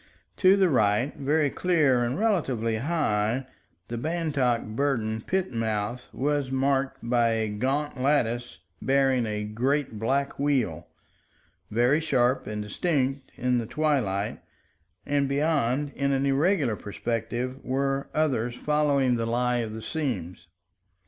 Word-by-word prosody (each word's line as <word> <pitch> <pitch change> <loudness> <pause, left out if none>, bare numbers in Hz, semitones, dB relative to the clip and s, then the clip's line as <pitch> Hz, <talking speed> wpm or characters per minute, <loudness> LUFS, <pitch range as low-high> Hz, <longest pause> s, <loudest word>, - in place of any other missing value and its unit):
To 190 +1 +5
the 190 -1 +4
right, 115 -2 +2
very 145 +1 +1
clear 150 -9 +2
and 120 +2 -1
relatively 135 - 0
high, 125 -4 0 0.4
the 120 0 -4
Bantock 145 -6 0
Burden 110 -2 -1
pit 190 +3 -1
mouth 115 +1 -2
was 145 0 -1
marked 135 -1 0
by 120 -1 +3
a 110 -1 0
gaunt 130 +6 -2
lattice 120 -4 0 0.2
bearing 135 -3 +2
a 105 -1 -2
great 125 +3 -1
black 135 +6 -1
wheel, 120 - 0 0.8
very 120 +7 +3
sharp 130 -5 +1
and 105 0 -3
distinct 135 - -1
in 125 -1 +1
the 115 - -4
twilight, 120 -11 0 0.6
and 140 -1 +1
beyond, 140 -1 +1
in 140 0 0
an 135 0 +1
irregular 140 - +2
perspective, 120 +5 -4
were 135 +1 -1
others 125 -6 0
following 140 -4 +2
the 115 0 -1
lie 125 +1 +1
of 110 -2 -3
the 110 - -7
seams. 95 - -4
130 Hz, 130 wpm, -26 LUFS, 115-145 Hz, 0.8 s, To